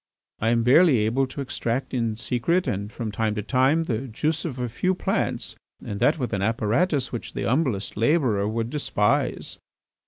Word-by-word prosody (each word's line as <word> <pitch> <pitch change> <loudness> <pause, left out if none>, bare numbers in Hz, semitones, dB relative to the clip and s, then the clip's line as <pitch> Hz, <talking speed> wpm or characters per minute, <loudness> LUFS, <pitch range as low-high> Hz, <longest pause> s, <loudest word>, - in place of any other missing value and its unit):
I 110 - +1
am 115 0 +2
barely 140 +3 +6
able 130 +5 +1
to 130 +2 -6
extract 130 -1 -3
in 115 -3 0
secret 125 +11 0
and 100 +2 -3
from 110 -2 -4
time 110 0 -1
to 105 - -3
time 135 +7 +2
the 130 -3 -3
juice 155 +8 -1
of 140 -6 -4
a 125 -1 -2
few 185 +11 0
plants - - -1 0.3
and 100 - -4
that 150 +8 +3
with 125 -6 -3
an 100 - 0
apparatus 120 - +1
which 120 - -6
the - - -3
humblest 125 -7 0
labourer 115 -4 +2
would 115 +2 -2
despise." 135 -1 0
125 Hz, 180 wpm, -24 LUFS, 110-145 Hz, 0.3 s, barely